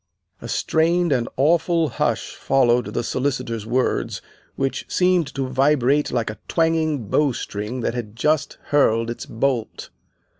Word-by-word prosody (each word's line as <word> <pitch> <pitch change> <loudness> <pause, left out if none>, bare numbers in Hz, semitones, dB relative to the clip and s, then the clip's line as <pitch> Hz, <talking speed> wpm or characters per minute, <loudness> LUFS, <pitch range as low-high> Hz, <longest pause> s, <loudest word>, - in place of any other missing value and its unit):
A - - -7
strained 170 +1 +1
and 120 -4 +1
awful 165 +2 +2
hush - - -1
followed 125 -3 +2
the 120 - -2
Solicitor's 120 -4 -2
words, 120 - 0 0.4
which 135 0 -2
seemed 180 -3 +2
to 135 -1 -1
vibrate 135 +1 +2
like 115 -3 -1
a 105 - -12
twanging 160 -6 +1
bowstring 120 -3 -1
that 115 - -1
had 115 -3 -5
just 150 +4 0
hurled 115 -5 +2
its 120 - -7
bolt. 120 -1 -2
135 Hz, 135 wpm, -22 LUFS, 120-155 Hz, 0.4 s, awful